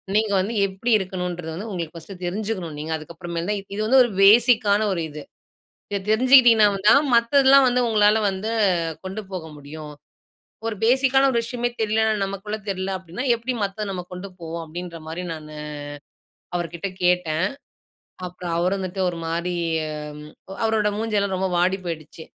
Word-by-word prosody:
நீங்க 215 -1 +2
வந்து 205 +5 -1
எப்படி 195 +6 -3
இருக்கணுன்றது 180 -3 -4
வந்து 215 +5 -6
உங்களுக்கு 170 -4 -5
ஃபர்ஸ்ட்டு 180 +3 -10
தெரிஞ்சுக்கணும் 185 -4 -3
நீங்க. 155 +2 -5
அதுக்கப்புறமேல் 170 +3 -6
தான், 210 -1 0 0.2
இது 215 - -2
வந்து 260 +3 +6
ஒரு 240 - -2
பேஸிக்கான 215 -1 +5
ஒரு 170 - -2
இது. 150 0 -8 0.7
இத 200 - 0
தெரிஞ்சுக்கிட்டிங்கனா 240 -2 +6 0.2
தான், 280 +2 +6
மத்ததெல்லாம் 270 +3 +5
வந்து 250 0 +2
உங்களால 210 -1 +4
வந்து 195 +4 -3 0.5
கொண்டு 195 +3 -4
போக 180 -4 -5
முடியும். 150 +1 -9 0.7
ஒரு 225 - -1
பேஸிக்கான 265 +2 +4
ஒரு 235 - +2
விஷயமே 240 +1 -2
தெரியலன்னா, 220 0 +2
நமக்குள்ள 200 +2 -4
தெரியல 190 0 -2
அப்படின்னா, 185 +8 -6
எப்படி 240 +3 -3
மத்தது 200 +1 -4
நம்ம 180 -1 -5
கொண்டு 180 +2 -7
போவோம்?" 165 +1 -5
அப்படின்ற 170 +1 -7
மாதிரி 175 +3 -5
நானு 155 -1 -10 1.0
அவருகிட்ட 170 +2 -3 0.2
கேட்டேன். 180 -1 +2 0.8
அப்புறம் 175 -1 -6
அவர் 180 +3 +1
வந்துட்டு 190 0 -4
ஒரு 170 - -6
மாரி, 170 +2 -2 1.1
அவரோட 220 -1 +2
மூஞ்செல்லாம் 205 -3 0
ரொம்ப 190 0 0
வாடி 185 +2 +2
போயிடுச்சு. 160 -1 -6
195 Hz, 145 wpm, -23 LUFS, 175-220 Hz, 1.1 s, வந்து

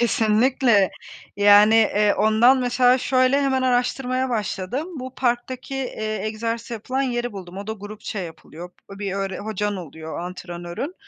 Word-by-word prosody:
kesinlikle. 230 -2 +3 0.5
Yani, 205 +2 +6
eee, 210 -2 +3
ondan 230 +5 +4
mesela 250 +1 +3
şöyle 255 +2 +2
hemen 265 -1 +1
araştırmaya 255 +1 0
başladım. 220 - -3
Bu 260 0 -7
parktaki, 255 +2 -2
eee, 215 -5 -3
egzersiz 230 +2 -4
yapılan 255 +4 -2
yeri 245 -3 -2
buldum. 185 -2 -9
O 200 - -7
da 220 - -2
grupça 210 0 -7
yapılıyor, 170 0 -8 0.2
bir 195 -1 -5
öğre 195 -1 -3
hocan 210 -1 -3
oluyor 160 -2 -8
antrenörün. 175 - -6
220 Hz, 135 wpm, -22 LUFS, 200-255 Hz, 0.5 s, Yani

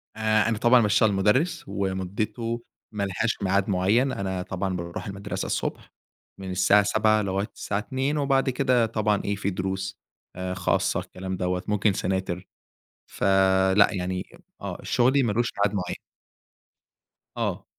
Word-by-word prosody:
آآ، 110 0 +2
أنا 115 - 0
طبعًا 120 +3 +5
باشتغل 105 0 +3
مدرّس، 130 - +2
ومدته 100 +5 -3 0.3
ما 105 -2 -2
لهاش 100 +4 -1
ميعاد 100 0 +1
معين، 100 +8 +2
أنا 95 -4 -3
طبعًا 95 0 -3
باروح 85 +2 -5
المدرسة 100 +1 -4
الصبح - - -3 0.5
من 95 -1 -6
الساعة 95 +3 +4
07:00 110 +1 +3
لغاية 100 0 -1
الساعة 100 - -3
14:00، 130 +7 -2
وبعد 135 -2 +2
كده 125 -2 +2
طبعًا 105 -2 0
إيه 100 - 0
في 100 0 -2
دروس 95 0 -3 0.4
آآ، 90 0 -3
خاصة، - - +1
الكلام 95 0 -6
دوّة 90 0 -1
ممكن 105 -1 +2
سناتر، 95 -1 -2 0.6
فلأ 95 0 +4
يعني 90 -1 -3 0.3
آه - - -5
شغلي 130 +3 +3
ما 115 - +1
لوش 120 +3 +1
ميعاد 100 0 +2
معين. 90 -2 -3 1.4
آه. - - -2
100 Hz, 140 wpm, -25 LUFS, 95-110 Hz, 1.4 s, طبعًا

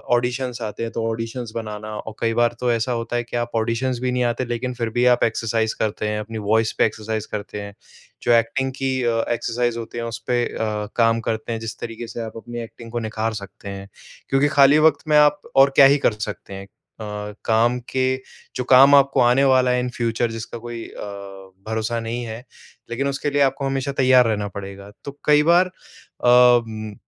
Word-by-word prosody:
Auditions 125 0 -2
आते 110 +1 -4
हैं, 115 - -4
तो 115 - -3
ऑडिशंस 115 +1 -5
बनाना 110 -1 -5
और 110 - -7
कई 115 0 0
बार 120 0 +2
तो 125 -1 +1
ऐसा 115 +2 0
होता 115 +1 -4
है 120 - 0
कि 120 0 -5
आप 120 0 -2
ऑडिशंस 120 +2 -1
भी 125 0 -1
नहीं 125 0 0
आते, 120 +1 -1
लेकिन 120 +1 -3
फिर 115 -2 -3
भी - - -15
भी 125 - +4
आप 120 - 0
एक्सरसाइज़ 110 -1 0
करते 105 0 -1
हैं, 105 0 -2
अपनी 110 +1 -6
वॉइस 110 +1 +2
पे - - +4
एक्सरसाइज़ 110 0 -3
करते 105 0 -5
हैं। 100 0 -8 0.5
जो - - +2
एक्टिंग 125 +4 +1
की 135 -1 -1
अ, 115 -1 +1
एक्सरसाइज़ 120 0 -1
होती 115 +1 -7
है, 115 - -3
उस 115 - -5
पे 120 -1 +1
अ, 105 -1 -3
काम 115 -1 +3
करते 110 +1 -3
हैं, 110 - -3
जिस 115 0 -6
तरीके 115 0 -6
से 115 - -6
आप 110 0 -7
अपनी 120 +1 -7
एक्टिंग 115 0 -12
को 120 - -2
निखार 110 0 -2
सकते 100 0 -12
हैं। 100 0 -7 0.4
क्योंकि 135 +2 +3
खाली 140 +2 +7
वक़्त 155 - -1
में 150 -1 +4
आप 150 0 +4
और 135 +1 +7
क्या 140 - +8
ही - - +1
कर - - +3 0.2
सकते 100 - -9
हैं? 95 0 -7
अ, 110 +2 -14 0.4
काम 115 +2 +2
के 130 0 +2 0.5
जो 125 - -2
काम 135 +2 +8
आपको 140 -1 +4
आने 125 +3 +4
वाला 130 -1 +3
है 125 - +2
इन 125 0 -2
फ्यूचर, 115 0 0
जिसका 115 +1 -6
कोई 120 0 -7
अ, - - -11 0.7
भरोसा 110 +1 -2
नहीं 115 +2 -4
है, 115 +2 -7 0.5
लेकिन 135 +4 -1
उसके 140 +1 -2
लिए 145 0 +1
आपको 135 0 +1
हमेशा 135 0 -1
तैयार 130 -1 +6
रहना 105 -2 -1
पड़ेगा। 100 0 -8
तो 140 0 -9
कई 150 0 +5
बार 180 +1 +5 0.6
अ, - - +4
उम, 115 -4 +4
115 Hz, 215 wpm, -22 LUFS, 110-125 Hz, 0.7 s, क्या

